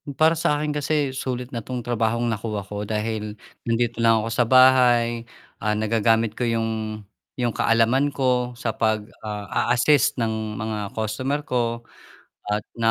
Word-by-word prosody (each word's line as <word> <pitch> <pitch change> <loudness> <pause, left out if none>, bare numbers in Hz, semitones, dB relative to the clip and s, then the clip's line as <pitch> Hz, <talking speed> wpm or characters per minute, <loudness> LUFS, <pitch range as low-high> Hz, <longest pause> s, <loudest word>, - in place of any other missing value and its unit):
Para 160 +2 +5
sa 150 - +2
akin 150 0 -1
kasi 145 -1 0
sulit 130 -1 -4
na 120 - -3
'tong 125 +2 -5
trabahong 115 0 0
nakuha 105 -1 -3
ko 105 +1 -6
dahil 105 0 -3 0.3
nandito 120 0 0
lang 115 -1 +4
ako 115 - -3
sa 120 +2 +2
bahay. 120 -2 +5 0.3
Ah, 105 0 0
nagagamit 110 0 +1
ko 120 - +1
yung 110 -2 -2 0.4
yung 120 -2 +1
kaalaman 115 +5 +3
ko 125 -2 0
sa 120 -1 -2
pag 110 -1 0 0.2
ah, 105 -1 -5 0.2
a-assist 125 +3 +3
ng 110 -3 -2
mga 105 -2 -4
customer 130 +7 -2
ko 120 -3 -1 0.7
at 105 0 -1
na 115 -1 +1
115 Hz, 155 wpm, -23 LUFS, 110-125 Hz, 0.7 s, Para